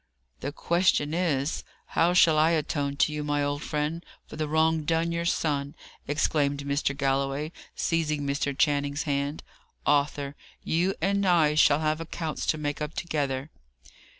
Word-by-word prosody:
"The 140 - -4
question 170 -2 +1
is, 160 -5 0 0.3
how 170 +2 +2
shall 165 -3 +6
I 155 +1 +5
atone 145 -3 -1
to 150 - +2
you, 150 0 -3
my 145 0 0
old 145 0 -2
friend, 155 +2 -2 0.2
for - - -11
the 155 0 -2
wrong 160 +1 +2
done 165 +2 0
your 170 0 -2
son?" 145 -4 -1 0.3
exclaimed 145 -1 +1
Mr. 140 0 -1
Galloway, 140 +2 0 0.2
seizing 155 -3 0
Mr. 140 0 -1
Channing's 145 -1 +1
hand. 140 +1 -2 0.4
"Arthur, 145 -1 +1 0.3
you 180 +4 +1
and 200 +1 +2
I 170 -5 +4
shall 150 0 +4
have 155 +1 0
accounts 160 -1 -4
to 155 - +2
make 145 -1 -3
up 150 0 -4
together." 140 -3 -2
150 Hz, 150 wpm, -27 LUFS, 145-160 Hz, 0.4 s, shall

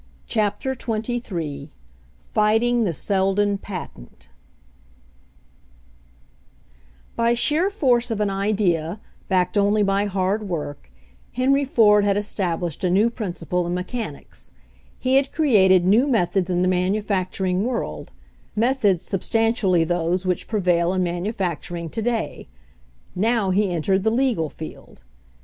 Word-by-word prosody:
CHAPTER 220 +4 -1
XXIII 215 - -4 0.5
FIGHTING 225 - +2
THE 180 - 0
SELDON 195 +3 0
PATENT 180 - -9 2.9
By 235 +1 +2
sheer 310 +10 +2
force 250 - +1
of 225 -2 -2
an 205 -1 0
idea, 195 -3 0 0.3
backed 185 +1 +1
only 205 +1 +3
by 195 +1 +1
hard 200 +1 -1
work, 145 - -5 0.4
Henry 275 +3 +2
Ford 210 -6 +4
had 200 0 +2
established 175 -5 -2
a 180 - +2
new 205 +6 +3
princi 185 -8 -5
ple 180 -1 0
in 175 - -2
mechanics; 180 - -6 0.5
he 260 +1 +2
had 275 0 +1
created 190 - +4
new 220 +9 +4
methods 195 -6 +1
in 180 0 +1
the - - +2
manufacturing 185 0 0
world 245 0 -4 0.2
— - - -34
methods 210 -9 +1
substantially 205 -3 +1
those 175 +2 -1
which 180 -2 -1
prevail 180 -4 +1
in 185 -1 +1
manufacturing 175 -2 -3
to 225 - -3
day; 230 0 -2 0.7
now 220 -1 +1
he 200 +1 +2
entered 190 +3 +1
the 220 - +2
legal 230 - 0
field. 155 - -11
200 Hz, 125 wpm, -22 LUFS, 180-225 Hz, 2.9 s, Ford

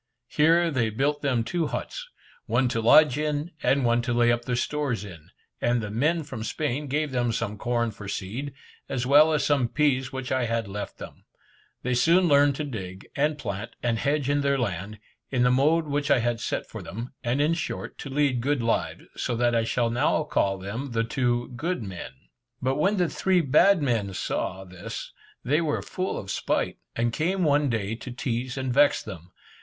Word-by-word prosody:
Here 165 +2 +4
they 120 -6 +1
built 145 +6 0
them 130 -5 +1
two 165 +6 -1
huts, - - -5 0.4
one 130 - +2
to 115 -2 -1
lodge 145 +4 +6
in, 150 +2 -1
and 135 -1 +2
one 120 0 +3
to 120 0 -2
lay 120 0 +4
up 120 0 -1
their 125 - -1
stores 125 -4 -1
in; 85 -6 -12 0.3
and 120 0 +2
the 105 -2 -4
men 155 +9 +1
from 130 -6 -6
Spain 145 +3 -2
gave 150 +1 -1
them 120 -2 0
some 115 -2 -2
corn 120 +1 -1
for 105 -1 -10
seed, 110 +9 -4 0.4
as 125 -2 -1
well 150 +4 +6
as 150 -3 +1
some 140 -5 +2
peas 135 -2 +1
which 130 -1 -5
I 130 -2 +1
had 115 -2 -1
left 100 +1 -6
them. - - -11 0.6
They 125 - 0
soon 170 +8 +4
learned 145 -2 +5
to 150 - -3
dig, 95 -9 -6
and 150 +2 +1
plant, 115 -3 -5
and 115 -2 +1
hedge 145 0 0
in 145 0 +2
their 140 0 +2
land, 105 -3 -3 0.3
in 125 -2 +1
the 125 - +4
mode 155 +6 +3
which 145 0 -1
I 140 - +5
had 120 -1 0
set - - -2
for - - -8
them, 115 +6 -7
and 120 +3 0
in 150 +3 +3
short, 165 - -4
to 140 - -6
lead 135 -3 +1
good 140 -1 0
lives, 115 - -1
so 120 - -1
that 120 +1 +2
I 115 -1 +2
shall 115 0 0
now 135 +5 +2
call 100 -9 0
them 115 +8 -5
the 115 0 +1
"two 120 0 0
good 160 +1 -2
men." 95 -8 -7 0.5
But 130 +1 0
when 195 +7 +2
the 180 -2 +2
three 185 +2 +2
bad 170 +4 +4
men 110 -7 0
saw, 95 +1 -3
this, 90 -1 -8 0.3
they 150 +6 +2
were 155 -3 -1
full 185 +1 -3
of 100 - -5
spite, - - -1 0.2
and 115 0 0
came 180 +6 0
one 145 -2 +3
day 110 -3 -1
to 120 +3 -7
tease 125 +1 -3
and 130 -2 -1
vex 145 +2 +4
them. 90 -4 -9
125 Hz, 205 wpm, -26 LUFS, 115-145 Hz, 0.6 s, lodge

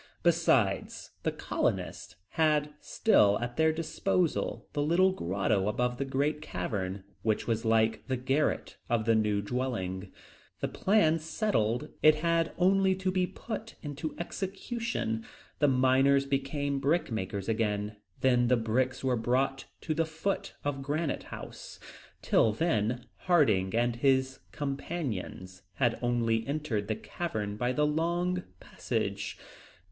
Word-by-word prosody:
Besides, 150 - +2
the - - 0
colonists - - -2
had 150 -2 +2
still 105 - +3
at 120 +1 -4
their 160 0 +4
disposal 165 +2 -1
the 145 - 0
little 175 +5 +4
grotto 95 - 0
above 125 +3 0
the 140 - 0
great 145 +3 0
cavern, 95 -9 -3 0.2
which 110 -1 0
was 115 0 -1
like 110 0 +2
the 130 -1 0
garret 135 +4 0
of 115 -3 +1
the 115 - +4
new 105 -2 +1
dwelling. 100 -6 -3 0.5
This - - -2
plan 185 -6 +3
settled, 155 - 0
it 155 0 +7
had 165 +1 +1
only 190 +1 +4
to 190 0 -1
be 185 -1 +1
put 225 +2 -7
into 145 +1 -5
execution. 190 - -3 0.4
The 145 - +4
miners 135 +1 +4
became 140 0 -1
brickmakers 110 - -1
again, 105 -2 -1 0.2
then 125 -2 +4
the 125 +1 +4
bricks 125 +4 0
were 130 -1 +2
brought 130 +4 0 0.2
to 155 - -1
the 165 +1 0
foot 160 +5 -3
of 145 -1 -2
Granite 145 +3 -2
House. - - -9 0.4
Till 110 - +3
then, 120 -4 0 0.2
Harding 110 - +3
and 120 0 +1
his 130 0 +2
companions 135 - -4
had 120 -1 +1
only 115 -2 +1
entered 140 -9 -2
the 110 - 0
cavern 105 -13 -4
by 125 +3 0
the 150 +3 +2
long 170 +4 0 0.2
passage. - - -3
135 Hz, 130 wpm, -30 LUFS, 115-160 Hz, 0.5 s, it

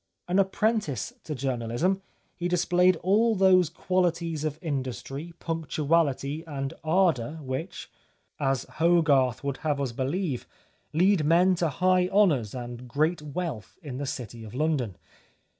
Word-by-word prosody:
An 180 +2 +2
apprentice 195 - 0
to 155 - -4
journalism, 130 +8 -1 0.3
he 175 - -2
displayed 180 +1 +3
all 220 +5 +3
those 185 -3 +5
qualities 170 -3 -1
of 155 -1 -2
industry, 140 0 -4
punctuality, 155 -2 0
and 135 -1 -4
ardour 160 -5 +2
which, 135 +7 -5 0.5
as 135 -3 +1
Hogarth 150 -7 +2
would 140 -1 -2
have 150 -2 -1
us 135 -3 -1
believe, 135 +3 -2 0.4
lead 180 +1 +3
men 175 +5 +4
to 170 -2 +1
high 180 +5 +2
honours 160 - +2
and 120 0 -7
great 155 +7 0
wealth 150 - -5
in 135 -5 -6
the 140 0 -3
city 120 -4 -6
of 110 +1 -10
London. 135 - 0
155 Hz, 130 wpm, -27 LUFS, 135-180 Hz, 0.5 s, those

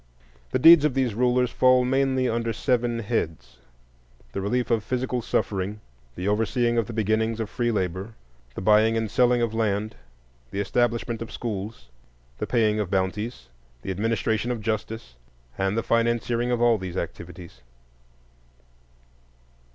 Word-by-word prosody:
The - - 0
deeds 165 +3 +8
of 150 -4 +1
these 130 -4 +1
rulers 125 +2 +2
fall 130 0 +4
mainly 130 0 +1
under 115 -1 -1
seven 120 -1 0
heads: 80 - -3 0.7
the 100 - -4
relief 120 +5 -1
of 115 -2 +2
physical 125 0 -2
suffering, 100 -1 -2 0.4
the 90 - -4
overseeing 115 +3 +1
of 115 - -1
the - - -6
beginnings 110 +1 0
of 110 -2 -4
free 120 -1 0
labor, 95 +1 -3 0.4
the - - -5
buying 110 +3 +4
and 110 -2 -2
selling 125 0 +3
of 115 -2 -1
land, 110 -1 -1 0.5
the 100 - -4
establishment 115 +2 0
of 115 - -6
schools, 100 - -5 0.5
the - - -2
paying 110 -3 +2
of 105 -4 -2
bounties, 100 +5 -2 0.3
the - - -3
administration 110 +3 -1
of 120 -2 -2
justice, 110 - -4 0.4
and 95 +3 -1
the 115 - 0
financiering 115 +1 +1
of 120 -1 +1
all 115 -2 +4
these 95 -1 -6
activities. 90 -5 -7
115 Hz, 145 wpm, -25 LUFS, 105-120 Hz, 0.7 s, deeds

